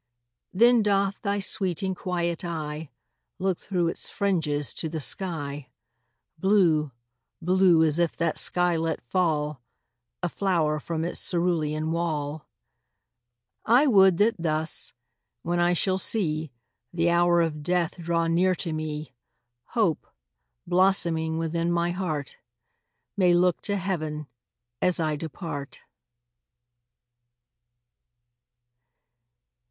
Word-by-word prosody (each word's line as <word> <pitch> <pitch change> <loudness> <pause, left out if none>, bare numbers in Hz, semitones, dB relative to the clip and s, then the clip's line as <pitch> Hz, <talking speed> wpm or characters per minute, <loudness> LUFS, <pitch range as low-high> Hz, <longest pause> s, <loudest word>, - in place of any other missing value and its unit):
Then 235 +4 +5
doth 200 -1 0
thy 200 0 -1
sweet 195 -3 0
and 190 -1 -1
quiet 175 -2 -2
eye 155 -3 -5 0.5
Look 190 -1 -1
through 180 -4 -1
its - - -4
fringes 155 -8 -1
to 160 - -2
the 160 0 -4
sky, 145 -4 -3 0.7
Blue 170 -6 +3 0.5
blue 180 -1 +4
as 155 0 +1
if 170 -2 0
that 170 -2 0
sky 175 -1 +2
let 160 0 -1
fall 150 -4 0 0.6
A - - +2
flower 165 -5 0
from 160 +1 -3
its 170 - -2
cerulean 160 -3 0
wall. 155 -3 -3 1.2
I 245 +6 +4
would 190 - +5
that 220 +4 +3
thus, 160 -1 +1 0.5
when 175 +1 -1
I 175 0 +3
shall 185 +2 +1
see 160 - 0 0.4
The 170 0 +1
hour 175 0 +3
of 160 -3 -1
death 175 +2 -1
draw 170 0 0
near 180 +3 +2
to 165 -1 -3
me, 155 -1 -5 0.5
Hope, - - 0 0.6
blossoming 170 -3 +2
within 165 +1 -1
my 170 0 +1
heart, 160 -7 -4 0.8
May 180 -3 +4
look 180 0 +2
to 200 - +1
heaven 155 -5 -3 0.6
as 180 -1 +3
I 155 -2 0
depart. 150 -2 -7
170 Hz, 115 wpm, -26 LUFS, 155-185 Hz, 1.2 s, Then